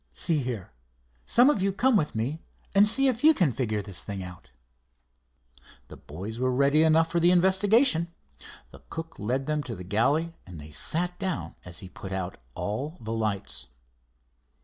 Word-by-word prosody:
See 155 - 0
here, 120 -7 -5 0.6
some 245 +2 +5
of 210 - -1
you 195 +1 +2
come 245 +6 +2
with 150 - +1
me 135 +9 -2 0.3
and 200 +1 +6
see 270 +6 +3
if 250 -1 0
you 315 0 +7
can 175 - +3
figure 110 -5 -1
this 95 -3 -2
thing 100 -2 -5
out." 90 -1 -11 1.4
The - - -10
boys 100 +10 -8
were 130 0 +1
ready 140 +4 +3
enough 160 +1 +4
for 170 - +2
the 170 +1 +4
investigation. 190 - +4 0.6
The - - -14
cook 165 0 -7
led 130 +6 -1
them 150 0 0
to 120 -5 -5
the 90 - -8
galley, 140 - +1
and 90 -4 -11
they 75 +1 -11
sat 175 - -1
down 185 -3 -3
as 90 -1 -6
he - - -8
put 95 +1 -9
out 95 -1 -4 0.2
all 135 - -4
the 110 0 -5
lights. 95 -11 -2
140 Hz, 175 wpm, -27 LUFS, -, 1.4 s, you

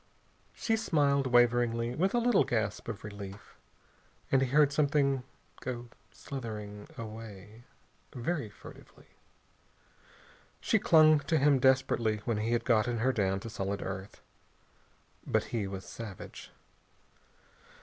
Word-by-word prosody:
She 225 -1 0
smiled 140 -9 +2
waveringly, 120 -1 +3
with 190 - +1
a - - +3
little 240 -3 +4
gasp 110 -3 -2
of 115 -3 -6
relief, 100 -1 -9 0.7
and 135 - +4
he 135 - +2
heard 145 +2 +4
something 140 -2 +2 0.4
go 120 -1 -5 0.2
slithering 105 -5 -7
away, 110 -1 -9 0.5
very 130 -1 -3
furtively. 105 - -15 1.5
She - - +2
clung 155 -2 +6
to 160 - +3
him 140 -1 +4
desperately 125 -4 +2
when 115 -3 0
he 110 +2 -1
had 120 - 0
gotten 120 0 +2
her 130 +4 +1
down 95 -3 0
to 115 - -7
solid 100 -1 -3
earth. 95 +1 -7 1.1
But - - +2
he 110 -4 -1
was 95 -1 -6
savage. 110 -5 -9
120 Hz, 120 wpm, -31 LUFS, 105-140 Hz, 1.5 s, clung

